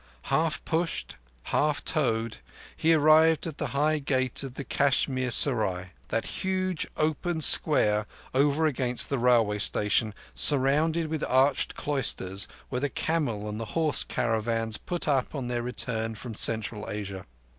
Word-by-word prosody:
Half 160 Hz, -1 st, 0 dB
pushed, 165 Hz, +1 st, -3 dB, 0.4 s
half 150 Hz, 0 st, 0 dB
towed, 115 Hz, -6 st, -1 dB, 0.4 s
he 165 Hz, +1 st, +2 dB
arrived 155 Hz, +1 st, +4 dB
at 160 Hz, -4 st, -7 dB
the -, -, -2 dB
high 150 Hz, +2 st, 0 dB
gate 130 Hz, -3 st, -1 dB
of 135 Hz, -2 st, -7 dB
the 140 Hz, -, -6 dB
Kashmir 130 Hz, -1 st, 0 dB
Serai: 105 Hz, -8 st, +2 dB, 0.2 s
that 115 Hz, -, -2 dB, 0.2 s
huge 185 Hz, -2 st, -2 dB
open 160 Hz, +2 st, -1 dB
square 105 Hz, -9 st, +5 dB, 0.3 s
over 145 Hz, +4 st, +2 dB
against 125 Hz, -4 st, 0 dB
the 140 Hz, -, -2 dB
railway 115 Hz, -4 st, +2 dB
station, 105 Hz, +1 st, +1 dB, 0.2 s
surrounded 150 Hz, +4 st, +3 dB
with 155 Hz, -1 st, -4 dB
arched 130 Hz, +2 st, +1 dB
cloisters, 100 Hz, -9 st, 0 dB, 0.2 s
where 125 Hz, -1 st, -3 dB
the 145 Hz, -, -1 dB
camel 135 Hz, -11 st, -2 dB
and 105 Hz, +1 st, -5 dB
horse 155 Hz, +7 st, 0 dB
caravans 115 Hz, 0 st, -2 dB
put 175 Hz, -2 st, -4 dB
up 140 Hz, 0 st, 0 dB
on 130 Hz, -3 st, -4 dB
their 120 Hz, -1 st, -2 dB
return 115 Hz, -2 st, -3 dB
from 115 Hz, +1 st, -8 dB
Central 110 Hz, 0 st, +1 dB
Asia. 100 Hz, -2 st, -6 dB
130 Hz, 140 wpm, -26 LUFS, 115-155 Hz, 0.4 s, square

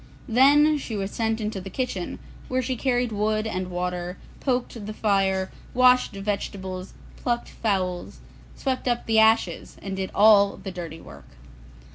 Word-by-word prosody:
Then 290 Hz, +5 st, +5 dB
she 230 Hz, -5 st, -5 dB
was 195 Hz, -1 st, -3 dB
sent 225 Hz, 0 st, -1 dB
into 210 Hz, -3 st, -3 dB
the 195 Hz, -, -7 dB
kitchen, 195 Hz, -5 st, -3 dB, 0.3 s
where 255 Hz, 0 st, 0 dB
she 255 Hz, +1 st, -1 dB
carried 245 Hz, -1 st, 0 dB
wood 215 Hz, +1 st, 0 dB
and 185 Hz, -4 st, -3 dB
water, 180 Hz, 0 st, -3 dB, 0.2 s
poked 245 Hz, -5 st, -2 dB
the 215 Hz, -, -4 dB
fire, 195 Hz, -3 st, +1 dB, 0.2 s
washed 250 Hz, -2 st, +5 dB
vegetables, 195 Hz, -2 st, -4 dB, 0.2 s
plucked 240 Hz, -1 st, -2 dB
fowls, 185 Hz, -5 st, -2 dB, 0.4 s
swept 260 Hz, -1 st, -2 dB
up 240 Hz, -1 st, 0 dB
the 225 Hz, -1 st, +3 dB
ashes, 220 Hz, -6 st, +2 dB
and 195 Hz, -1 st, -5 dB
did 190 Hz, 0 st, -3 dB
all 205 Hz, -1 st, +6 dB
the 190 Hz, -, -7 dB
dirty 170 Hz, -3 st, -7 dB
work. 70 Hz, -, -13 dB
210 Hz, 150 wpm, -25 LUFS, 190-240 Hz, 0.4 s, all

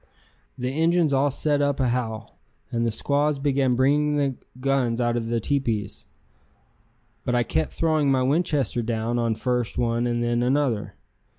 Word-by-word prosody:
The 125 Hz, 0 st, -2 dB
Injuns 165 Hz, -2 st, +3 dB
all 135 Hz, +2 st, +3 dB
set 145 Hz, +1 st, 0 dB
up 145 Hz, -1 st, 0 dB
a 130 Hz, -2 st, +2 dB
howl, 115 Hz, -3 st, -4 dB, 0.3 s
and 115 Hz, 0 st, 0 dB
the -, -, +2 dB
squaws 145 Hz, +6 st, 0 dB
began 135 Hz, -2 st, +1 dB
bringing 145 Hz, +3 st, +2 dB
the 140 Hz, -2 st, 0 dB, 0.2 s
guns 130 Hz, -3 st, 0 dB
out 120 Hz, -1 st, +1 dB
of 115 Hz, -1 st, -2 dB
the 115 Hz, 0 st, 0 dB
teepees. 115 Hz, -5 st, -2 dB, 1.2 s
But 125 Hz, -, 0 dB
I 120 Hz, -, +3 dB
kept 80 Hz, -7 st, -1 dB
throwing 155 Hz, -3 st, +1 dB
my 130 Hz, -1 st, +2 dB
Winchester 140 Hz, -3 st, +1 dB
down 115 Hz, +1 st, -1 dB
on 115 Hz, -1 st, 0 dB
first 125 Hz, 0 st, -1 dB
one 120 Hz, 0 st, 0 dB
and 120 Hz, 0 st, -1 dB
then 120 Hz, 0 st, 0 dB
another. 125 Hz, -4 st, 0 dB
125 Hz, 165 wpm, -24 LUFS, 120-140 Hz, 1.2 s, Injuns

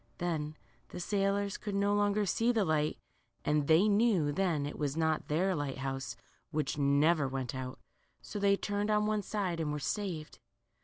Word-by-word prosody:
Then 155 Hz, -3 st, -2 dB, 0.3 s
the -, -, -7 dB
sailors 200 Hz, +2 st, 0 dB
could 205 Hz, -2 st, -4 dB
no 200 Hz, +1 st, +2 dB
more 205 Hz, 0 st, +2 dB
see 230 Hz, +5 st, +2 dB
the 220 Hz, -4 st, +2 dB
light, 155 Hz, -2 st, +1 dB, 0.5 s
and 150 Hz, -1 st, +2 dB
they 165 Hz, +6 st, +5 dB
knew 205 Hz, -8 st, +3 dB
then 165 Hz, -3 st, 0 dB
it 145 Hz, -, -6 dB
was 145 Hz, 0 st, -1 dB
not 160 Hz, -1 st, +1 dB
their 180 Hz, +6 st, +1 dB
light 145 Hz, -4 st, -3 dB
house, 135 Hz, -3 st, -4 dB, 0.3 s
which 155 Hz, -1 st, -1 dB
never 145 Hz, +2 st, +3 dB
went 130 Hz, -2 st, -3 dB
out; 130 Hz, -1 st, -5 dB, 0.4 s
so 205 Hz, -, -6 dB
they 200 Hz, 0 st, +4 dB
turned 205 Hz, +1 st, -1 dB
on 210 Hz, 0 st, +3 dB
one 215 Hz, 0 st, +1 dB
side 190 Hz, -4 st, -2 dB
and 155 Hz, -2 st, -1 dB
were 150 Hz, -, -2 dB
saved. 165 Hz, -1 st, -3 dB
170 Hz, 175 wpm, -32 LUFS, 150-205 Hz, 0.5 s, they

